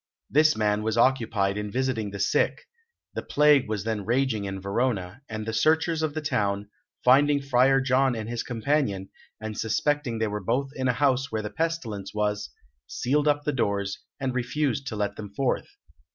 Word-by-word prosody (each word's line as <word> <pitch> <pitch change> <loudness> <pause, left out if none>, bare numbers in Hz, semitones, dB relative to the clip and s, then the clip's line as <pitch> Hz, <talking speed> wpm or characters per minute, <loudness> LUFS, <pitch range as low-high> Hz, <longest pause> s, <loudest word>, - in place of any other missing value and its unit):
This 155 0 +4
man 105 -1 +1
was 110 +1 -1
occupied 115 -6 +2
in 105 0 -4
visiting 125 -3 -1
the 100 - -7
sick; 100 - +1 0.5
the - - -3
plague 150 -4 +4
was 105 -3 -2
then 110 -2 -2
raging 115 -2 0
in 95 0 -4
Verona, 100 +1 -1
and 110 -1 -4
the 110 - -3
searchers 160 +5 +2
of 155 -1 -1
the 155 - -3
town, 100 -7 -1 0.3
finding 140 +3 +5
Friar 135 0 +3
John 130 -1 +2
and 110 -1 -4
his 120 0 -2
companion, 115 -5 -1 0.3
and 110 -1 -5
suspecting 135 +3 0
they 110 - 0
were 105 -1 -3
both 135 +7 0
in 130 -2 -2
a 125 - +3
house 135 0 +1
where 110 -1 -2
the 105 - -5
pestilence 110 -11 -3
was, 105 0 -1 0.4
sealed 145 +4 0
up 145 0 +2
the 150 - -1
doors, 100 -5 -1 0.2
and 135 -2 -1
refused 135 +2 -1
to 110 - -3
let 105 -1 -2
them 105 -1 -7
forth. 135 +1 0
120 Hz, 180 wpm, -26 LUFS, 105-135 Hz, 0.5 s, finding